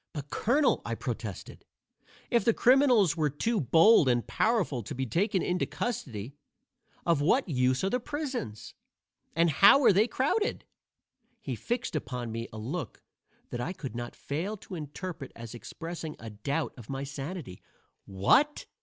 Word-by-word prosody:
"But, 145 -2 -7
Colonel," 280 +7 +2
I - - -3
protested, - - -6 0.7
"if 235 -4 +3
the 230 - +3
criminals 245 - +5
were 155 -3 +1
too 210 - 0
bold 160 - +6
and 120 -1 +1
powerful 215 - +1
to 100 - -7
be 130 +1 -2
taken 190 - +1
into 180 0 0
custody, 130 - -4 0.7
of 165 -4 +2
what 220 - +3
use 130 -3 +1
are 190 - +2
the 250 - +1
prisons? 255 - -5 0.6
And 170 0 +3
how 200 - +7
are 210 - +7
they 210 +5 +4
crowded?" 415 - 0 0.7
He - - -4
fixed 240 -6 -3
upon 125 -5 -3
me 115 +1 -4
a 110 - -9
look 130 - -5 0.5
that 120 - -3
I 170 +9 -3
could 135 - -7
not 120 0 -5
fail 175 +10 -3
to 190 - -12
interpret 155 -1 -6
as 115 0 -8
expressing 165 +5 -7
a 115 0 -9
doubt 140 +10 -2
of 120 -4 -12
my 135 0 -3
sanity. 140 - -6 0.4
"What!" 100 - +2
160 Hz, 155 wpm, -29 LUFS, -, 0.7 s, how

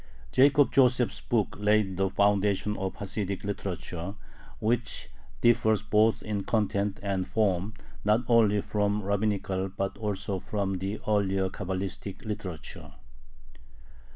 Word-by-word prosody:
Jacob 140 +2 +5
Joseph's 125 -2 +3
book 110 -5 0
laid 105 -2 +2
the 95 +1 +1
foundation 100 +1 +2
of 95 -1 -3
Hasidic 100 -1 -3
literature, 95 -2 -4 0.4
which 120 +1 -1 0.3
differs 110 -2 +3
both 110 +1 +3
in 105 -2 -2
content 100 -2 0
and 95 -2 -1
form 105 -1 0 0.3
not 105 +3 +3
only 110 -4 +4
from 105 0 0
rabbinical 100 -1 0
but 95 +1 -4
also 100 -2 -2
from 95 -1 -2
the 100 +3 -3
earlier 95 -2 +1
Cabalistic 95 +1 -5
literature. 100 -7 -6
100 Hz, 115 wpm, -28 LUFS, 95-110 Hz, 0.4 s, Jacob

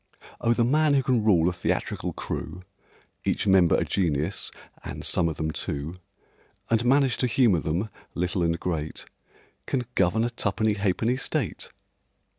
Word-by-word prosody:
Oh, 115 - +3
the 120 0 +2
man 150 +3 +3
who 135 - +3
can 125 -4 +2
rule 90 -6 +4
a 90 - +1
theatrical 90 - -2
crew, 90 - -5 0.6
Each - - 0
member 95 -4 +5
a - - +1
genius 85 -1 0 0.3
(and - - -6
some 85 -1 +2
of 80 - -5
them 80 -1 -1
two), 75 +4 -4 0.7
And 115 0 +3
manage 135 0 +3
to 125 - +1
humour 115 -6 +3
them, 85 +8 -1 0.3
little 90 +1 -1
and 85 0 +1
great, 80 -4 -3 0.6
Can 130 -2 0
govern 100 +4 +2
a 120 - -1
tuppenny 110 -1 0
ha'penny 105 +5 0
State! 135 - -3
100 Hz, 155 wpm, -26 LUFS, 85-120 Hz, 0.7 s, member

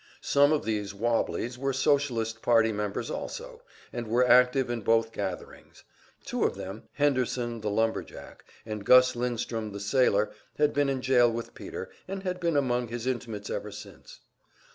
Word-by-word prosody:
Some 145 +1 +4
of 155 - +1
these 105 -3 -2
"wobblies" 120 +2 -1
were 135 0 -1
Socialist 125 -5 +1
party 115 -2 +4
members 105 -1 -3
also, - - -6 0.3
and 120 -2 -4
were 120 +3 +3
active 125 +1 +5
in 120 -1 -3
both 115 +2 +2
gatherings; 95 -5 -7 0.4
two - - -1
of - - +1
them, - - -7
Henderson, 125 -4 0
the 105 - -2
lumber 110 +2 +1
jack, - - -12 0.2
and 110 -2 -5
Gus 125 +3 +6
Lindstrom, 115 -3 -3
the 100 - -6
sailor, 105 -1 +2 0.3
had 150 0 +2
been 145 -1 +2
in 130 -2 -2
jail 125 -2 +4
with 115 0 -5
Peter, - - -7 0.2
and 195 0 -5
had 180 -1 -3
been 170 -4 +1
among 125 -3 +1
his 120 +1 -5
intimates 115 -5 -3
ever - - -4
since. - - -12
120 Hz, 165 wpm, -28 LUFS, 110-135 Hz, 0.4 s, Gus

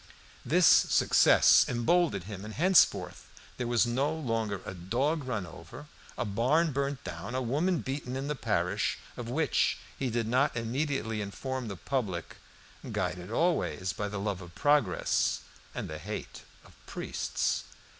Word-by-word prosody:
This - - +3
success - - +6
emboldened 125 - +2
him, 100 0 -8
and 110 0 -8
henceforth 185 +3 +3 0.3
there 125 - -2
was 120 0 +3
no 130 +5 0
longer 115 -10 -2
a - - -5
dog 130 - -1
run 110 -7 -2
over, 80 - -11 0.3
a - - -1
barn 130 +11 +2
burnt 140 0 -2
down, 90 +7 -6
a 130 - 0
woman 155 +8 0
beaten 130 -1 -4
in 135 +1 -3
the 150 - 0
parish, 145 - -1 0.2
of 120 -1 -6
which 160 +6 +1 0.2
he 130 - -1
did 115 -1 -1
not 130 +2 +2
immediately 115 -2 -2
inform 130 +5 -4
the 100 -3 -6
public, 100 -8 -3 0.5
guided 90 +1 -3
always 115 - 0
by 105 - -3
the 105 0 -4
love 100 -2 -2
of 85 -1 -12
progress 145 - +2 0.3
and - - -4
the - - -6
hate - - -6 0.2
of - - -17
priests. - - -2
120 Hz, 150 wpm, -30 LUFS, 105-140 Hz, 0.5 s, success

